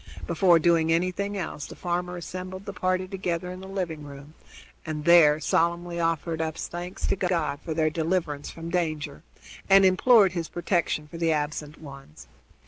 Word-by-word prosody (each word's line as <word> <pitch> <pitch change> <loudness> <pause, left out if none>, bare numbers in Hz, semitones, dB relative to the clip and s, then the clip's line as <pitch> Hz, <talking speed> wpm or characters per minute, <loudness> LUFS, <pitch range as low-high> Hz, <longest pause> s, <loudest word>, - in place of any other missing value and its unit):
Before 170 +1 +4
doing 165 0 +3
anything 185 +4 0
else 160 -5 -5
the - - -10
farmer 180 0 -3
assembled 185 +2 -7
the 200 - -6
party 185 -1 -1
together 180 -2 -3
in 185 - -8
the 190 - -9
living 180 -6 -4
room, 145 +1 -11 0.5
and 155 -2 -5
there 160 -3 +7
solemnly 170 +2 0
offered 165 0 -1
up 160 0 -3
thanks 175 +2 -5
to - - +1
God 170 -7 -1
for 160 - -4
their 155 -1 +2
deliverance 160 -3 -2
from 165 0 -8
danger, 155 -5 -2 0.5
and 195 0 +7
implored 195 +2 +5
his 170 -2 -4
protection 170 -3 -1
for 165 - -9
the 165 -1 +2
absent 150 0 -3
ones. 135 - -12
170 Hz, 165 wpm, -26 LUFS, 155-185 Hz, 0.5 s, there